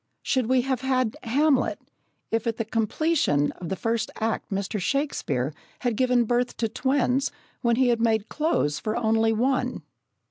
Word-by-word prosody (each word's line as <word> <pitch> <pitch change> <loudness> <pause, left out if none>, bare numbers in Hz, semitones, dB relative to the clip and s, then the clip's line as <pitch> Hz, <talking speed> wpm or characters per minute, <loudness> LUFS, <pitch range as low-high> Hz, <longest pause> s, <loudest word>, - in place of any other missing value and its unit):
Should 255 -4 +1
we 255 0 +3
have 260 -1 -1
had 255 -4 +1
Hamlet, 275 +3 +2 0.5
if 225 0 0
at 225 -1 -1
the 225 - -2
completion 225 - +1
of 175 - -8
the 190 - -1
first 230 +2 -1
act 225 0 -1
Mr. 200 +2 -2
Shakespeare 185 - -1 0.3
had 245 -3 0
given 250 0 +3
birth 245 +2 0
to 225 - 0
twins, 265 +2 +1 0.3
when 235 -2 +3
he 255 0 +3
had 235 -1 +1
made 220 -2 +2
clothes 225 - 0
for 215 0 -2
only 225 -1 +2
one? 255 +4 0
235 Hz, 165 wpm, -25 LUFS, 220-260 Hz, 0.5 s, we